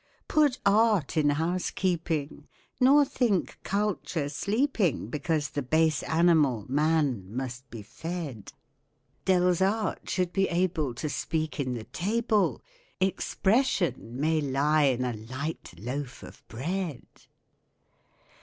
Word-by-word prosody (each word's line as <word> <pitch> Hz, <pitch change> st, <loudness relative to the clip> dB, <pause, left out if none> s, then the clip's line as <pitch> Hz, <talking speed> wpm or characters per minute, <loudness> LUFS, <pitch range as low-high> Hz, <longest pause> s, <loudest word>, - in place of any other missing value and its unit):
Put 295 Hz, -4 st, +3 dB
art 205 Hz, -5 st, +3 dB
in 150 Hz, -2 st, +3 dB
housekeeping, 160 Hz, -2 st, -1 dB, 0.3 s
nor 280 Hz, +3 st, +6 dB
think 235 Hz, -8 st, 0 dB
culture 195 Hz, -7 st, -1 dB
sleeping 200 Hz, -, 0 dB
Because 150 Hz, +1 st, -1 dB
the 145 Hz, -, -2 dB
base 155 Hz, +1 st, +2 dB
animal, 160 Hz, -, +3 dB
man, 145 Hz, -, +1 dB
must 130 Hz, +1 st, -5 dB
be 115 Hz, -4 st, -8 dB
fed. 160 Hz, -, -6 dB, 0.8 s
Delsarte 190 Hz, +3 st, +1 dB
should 180 Hz, -1 st, 0 dB
be 195 Hz, -1 st, +2 dB
able 170 Hz, -7 st, 0 dB
to 155 Hz, -, -3 dB
speak 155 Hz, +1 st, -2 dB
in 130 Hz, -3 st, -1 dB
the 115 Hz, -, -5 dB
table 215 Hz, -, 0 dB, 0.4 s
'Expression' 190 Hz, -, 0 dB
may 155 Hz, +1 st, +2 dB
lie 145 Hz, +2 st, +2 dB
in 125 Hz, -2 st, +1 dB
a 125 Hz, -, -1 dB
light 130 Hz, +9 st, -6 dB
loaf 125 Hz, +5 st, -5 dB
of -, -, -12 dB
bread. 160 Hz, +4 st, -4 dB
160 Hz, 110 wpm, -28 LUFS, 135-190 Hz, 0.8 s, nor